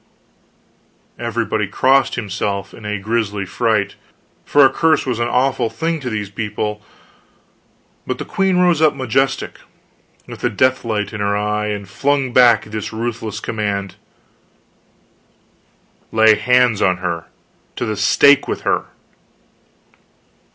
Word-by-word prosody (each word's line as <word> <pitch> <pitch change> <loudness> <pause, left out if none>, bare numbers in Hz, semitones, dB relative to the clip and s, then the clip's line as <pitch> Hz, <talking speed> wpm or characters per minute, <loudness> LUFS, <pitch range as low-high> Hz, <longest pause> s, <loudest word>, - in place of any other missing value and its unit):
Everybody - - -2
crossed 135 0 +2
himself 100 -2 -3
in 110 - -12
a 105 0 -2
grisly 105 -1 -2
fright, 105 -1 0 0.5
for 145 -1 +5
a - - +6
curse 160 +1 +2
was 125 -3 -2
an 120 - 0
awful 125 -1 +1
thing 165 +3 -2
to 130 -3 -5
those 105 -3 -4
people; 105 0 -4 1.3
but - - -2
the - - -6
queen 190 -1 0
rose 175 -3 +3
up 155 -1 +4
majestic, 135 +1 -1 0.7
with - - -10
the 120 - 0
death 130 +4 +1
light 105 -3 -2
in 110 - -5
her 100 0 0
eye, 105 0 -1
and 105 -2 -4
flung 135 +5 -1
back 120 -3 +5
this 110 -1 -5
ruthless 110 -1 -4
command: 100 -3 -3 2.2
"Lay 110 0 +5
hands 125 -1 +2
on 90 -1 +2
her! 85 -2 -4 0.5
To - - -3
the 110 -2 -2
stake 140 +7 +4
with - - -3
her!" - - 0
110 Hz, 130 wpm, -18 LUFS, 105-130 Hz, 2.2 s, a